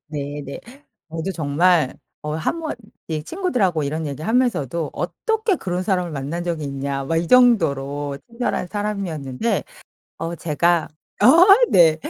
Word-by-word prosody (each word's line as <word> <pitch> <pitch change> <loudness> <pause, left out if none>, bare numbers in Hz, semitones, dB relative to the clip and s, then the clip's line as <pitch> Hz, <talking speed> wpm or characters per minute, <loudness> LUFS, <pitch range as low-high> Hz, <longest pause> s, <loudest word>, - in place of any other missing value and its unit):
네네. 145 -1 -6 0.5
저도 165 +4 -3
정말 160 -1 +2 0.3
어 150 0 -3
한번 315 - -2 0.4
예 155 -1 -2
친구들하고 220 - 0
이런 155 +2 -2
얘기를 145 +3 -5
하면서도 170 - 0
"어떻게 435 - -1
그런 180 0 -3
사람을 180 -3 0
만난 150 +4 -4
적이 165 -3 -2
있냐?" 140 0 -3
막 165 +4 -1
이 165 0 0
정도로 145 - +3
친절한 235 -5 -2
사람이었는데. 200 - -2 0.6
어 170 +1 -3
제가 170 +1 +1 0.4
어 - - +7 0.4
네. 165 -3 +6
165 Hz, 285 characters per minute, -21 LUFS, 145-200 Hz, 0.6 s, 어